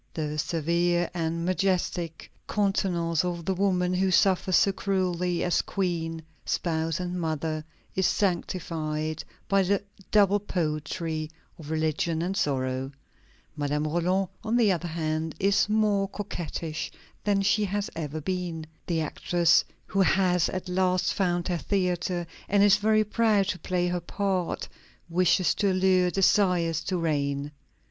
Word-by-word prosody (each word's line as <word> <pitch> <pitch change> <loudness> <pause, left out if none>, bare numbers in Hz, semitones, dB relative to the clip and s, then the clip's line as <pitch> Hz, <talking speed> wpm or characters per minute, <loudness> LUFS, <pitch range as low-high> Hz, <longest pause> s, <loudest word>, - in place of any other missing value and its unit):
The 150 -1 -2
severe 170 +2 +1
and 165 0 -2
majestic 180 -3 -1 0.2
countenance 180 -5 +1
of 175 -2 -3
the 190 - +1
woman 180 -1 +1
who 190 +1 +2
suffers 185 0 +3
so 195 - +5
cruelly 180 -3 -1
as 175 - +2
queen, 165 -4 -2 0.2
spouse, 165 -1 -1
and 180 0 -3
mother, 155 -1 -2 0.3
is 190 -1 +2
sanctified 160 -5 -1 0.2
by 195 0 +3
the 195 +1 +1 0.3
double 205 -1 +4
poetry 155 -3 -2 0.3
of 155 -2 -9
religion 160 +1 0
and 185 +2 -2
sorrow. 130 -4 -1 0.6
Madame 150 0 -1
Roland, 180 +4 +1
on 225 +2 +1
the 220 -4 +4
other 175 -1 -1
hand, 160 -1 -2
is 200 +2 +3
more 210 -2 +2
coquettish 170 -6 -4 0.3
than 200 -1 +2
she 210 +2 +3
has 205 +1 -2
ever 155 -1 -4
been. 175 -2 -3 0.2
The 165 -2 0
actress 170 +2 +2 0.2
who 195 - 0
has 180 -2 +3
at 185 0 -4
last 185 0 +1
found 175 -2 0
her 175 -2 -1
theatre 180 -2 -1 0.2
and 200 0 +4
is 205 0 +6
very 215 +1 +3
proud 210 -2 +2
to 185 - -2
play 180 -1 -1
her 175 0 -1
part, 185 0 -2 0.4
wishes 180 +1 +3
to 200 -2 +1
allure, 185 -1 +3
desires 180 -4 +2
to 185 - -1
reign. 145 -3 -1
175 Hz, 140 wpm, -27 LUFS, 160-195 Hz, 0.6 s, is